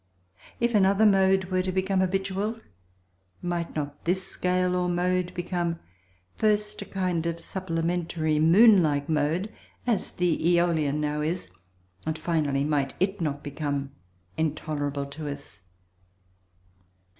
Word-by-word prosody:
If 235 0 +1
another 200 +1 +4
mode 190 -2 +4
were 185 0 +2
to 185 0 -2
become 190 +1 0
habitual, 195 +4 -1 0.8
might 175 -1 -2
not 145 -1 -4
this 185 +2 0
scale 180 0 0
or 180 0 0
mode 180 0 0
become 175 -1 -2 0.6
first 210 -1 0
a - - -5
kind 180 -4 -1
of 170 0 -3
supplementary 165 -3 -1
moon 195 +6 +7
like 145 -3 0
mode 160 +7 0 0.3
(as 230 -6 +1
the 175 -2 0
Æolian 170 -4 +2
now 150 0 -1
is) 160 - -2 0.5
and 160 0 -2
finally 155 -4 0
might 145 -2 0
it 190 0 0
not 145 -3 -2
become 145 -1 -3 0.5
intolerable 145 -2 -2
to 145 +2 -6
us? 140 -7 -9
175 Hz, 125 wpm, -27 LUFS, 150-190 Hz, 0.8 s, moon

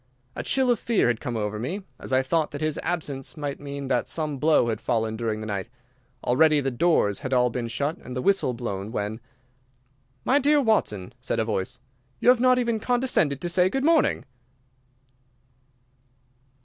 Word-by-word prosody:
A - - -3
chill 265 -2 +2
of 235 - +1
fear 225 - +2
had 120 -2 0
come 120 -2 -3
over 105 0 -2
me, 180 - -4 0.2
as - - -7
I 130 0 +3
thought 155 +3 0
that 145 - -7
his 155 -1 -1
absence 145 -5 -3
might 145 -2 -4
mean 140 -1 -6
that 125 -2 0
some 150 -4 -3
blow 150 -5 +3
had 110 - -3
fallen 110 -1 0
during 110 -1 -2
the - - -5
night. 100 0 -4 0.5
Already 155 +4 +4
the 135 -1 -1
doors 120 - +2
had 130 - -4
all 125 -1 +3
been 120 0 -3
shut 140 +7 -2
and 125 - -9
the 125 - -2
whistle 190 -11 +2
blown, 105 -4 -4
when— 105 0 -3 1.1
"My 275 +3 +4
dear 290 +2 +4
Watson," 160 - 0
said - - -2
a 110 - +1
voice, 105 0 -2 0.4
"you - - +4
have 250 -1 +6
not 255 0 +5
even 235 -3 0
condescended 245 - +1
to 175 - -2
say 180 +1 +3
good 270 +7 -1
morning." 320 - +3
140 Hz, 185 wpm, -25 LUFS, 115-190 Hz, 1.1 s, have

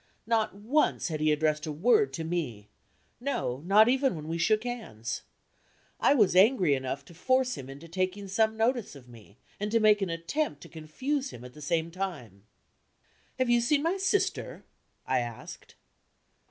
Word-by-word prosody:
Not 220 -2 0
once 225 +2 +1
had 155 -2 -3
he 155 0 +2
addressed 150 0 0
a - - -2
word 245 - +3
to 165 - -4
me 150 -12 -4 0.5
no, 190 - -2
not 210 +3 +6
even 265 -3 +2
when 155 -1 -7
we 165 +1 -3
shook 215 +5 +2
hands. 215 - -5 0.8
I 285 - +4
was 210 -8 +3
angry 190 - +5
enough 135 +1 -3
to - - -15
force 255 +7 +1
him 130 - -9
into 140 +5 -10
taking 185 +3 -2
some 220 +3 +1
notice 230 - 0
of 130 -3 -14
me, 110 -4 -16 0.2
and 210 +1 -2
to 230 +1 +2
make 210 -1 +4
an 195 - -1
attempt 165 - -2
to - - -12
confuse 260 - -3
him 120 - -11
at 125 - -11
the 150 - -13
same 165 +2 -1
time. 145 - -6 0.9
"Have 255 -2 +1
you 240 0 +4
seen 285 +5 +2
my 340 +4 +1
sister?" 390 +1 -1 0.4
I - - +1
asked. 120 -2 -8
185 Hz, 175 wpm, -29 LUFS, 150-240 Hz, 0.9 s, not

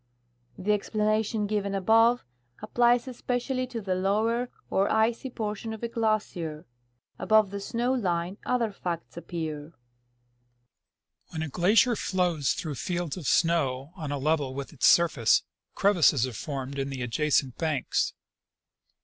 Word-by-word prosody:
The 205 +3 0
explanation 215 +1 0
given 200 -1 -1
above 225 - +4 0.3
applies 240 +3 +2
especially 255 +1 -2
to 235 -2 -5
the 190 -2 -1
lower 220 +6 0 0.2
or 195 +1 +1
icy 225 +4 +1
portion 220 -1 -4
of 220 - -9
a - - 0
glacier; 210 -9 -2 0.5
above 215 -2 +3
the 200 - -4
snow 240 +5 -1
line 185 -5 -1
other 235 -3 0
facts 175 -4 -5
appear. 160 -2 -5 1.5
When 160 - -4
a 160 - -4
glacier 205 - +4
floAvs 180 - 0
through 155 -4 -4
fields 175 -4 -2
of 170 -8 -6
snow 145 -5 +1
on 155 -6 -5
a 145 - -1
level 140 -2 0
with 140 +2 -6
its 140 - +3
surface, 155 -9 +4 0.3
crevasses 165 - +4
are 130 - -6
formed 135 +3 -5
in 135 0 -2
the 130 -2 -4
adjacent 130 +1 0
banks. 155 -5 0
185 Hz, 135 wpm, -27 LUFS, 155-220 Hz, 1.5 s, above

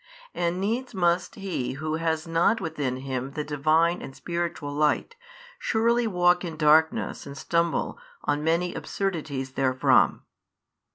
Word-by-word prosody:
And 175 +1 -1
needs 230 +5 -2
must 175 -1 +1
he 185 -11 -3
who 155 +3 -3
has 160 -1 -1
not 165 +7 +2
within 145 -6 -2
him 130 0 -4
the 150 - -3
Divine 155 +4 +2
and 135 - -8
spiritual 170 -4 -3
Light 150 - +1 0.4
surely 235 +1 +2
walk 180 -2 +3
in 165 -3 -5
darkness 155 0 +3
and 140 0 -8
stumble 170 - 0 0.2
on 145 +1 0
many 170 +2 +1
absurdities 155 -9 -3
therefrom. 130 -1 +3
160 Hz, 130 wpm, -26 LUFS, 145-175 Hz, 0.4 s, walk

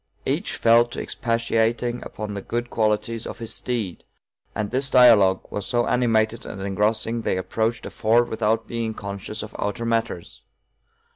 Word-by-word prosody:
Each - - -1
fell 115 +1 +5
to 120 - -7
expatiating 115 +1 0
upon 105 -1 -6
the 100 - -4
good 120 +4 -3
qualities 110 +1 0
of - - -7
his 115 -1 -4
steed, 115 -8 -3 0.5
and 105 -1 -2
this 130 +2 +1
dialogue 110 -8 +6
was 105 - -4
so 120 -1 +1
animated 115 -2 +1
and 100 - -7
engrossing 105 +4 0
they 95 - 0
approached 110 +5 -1
a - - -6
ford 115 +1 +3
without 110 0 0
being 115 -2 -3
conscious 100 +2 -6
of 110 - -10
outer 115 +3 -2
matters. 115 -7 -2
115 Hz, 155 wpm, -23 LUFS, 105-120 Hz, 0.5 s, dialogue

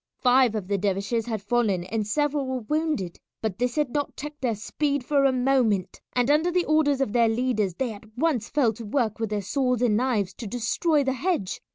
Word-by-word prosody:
Five 250 -2 +4
of 205 -4 -3
the 200 0 0
dervishes 200 +4 -1
had 220 -4 -3
fallen 220 -7 +1
and 210 +3 -3
several 290 +3 0
were 260 -1 -2
wounded, 300 - -2 0.2
but 220 -2 -3
this 250 0 0
had 300 -5 0
not 290 -1 -2
checked 295 +1 -7
their 240 -4 0
speed 285 +6 -2
for 280 -1 +3
a 270 - +5
moment, 245 -7 +1
and 245 +2 +2
under 315 +4 +3
the 355 0 +1
orders 290 -3 +2
of 215 -6 -1
their 235 -2 +4
leaders 220 -6 0
they 245 0 -2
at 215 +2 -15
once 265 -6 0
fell 260 -6 +2
to 230 +2 -9
work 225 -3 0
with 225 -2 -1
their 210 -1 -2
swords 250 +2 0
and 215 -4 +3
knives 220 -7 0
to 225 - -7
destroy 265 - +1
the 265 -1 0
hedge. 260 - -2
245 Hz, 215 wpm, -25 LUFS, 215-280 Hz, 0.2 s, a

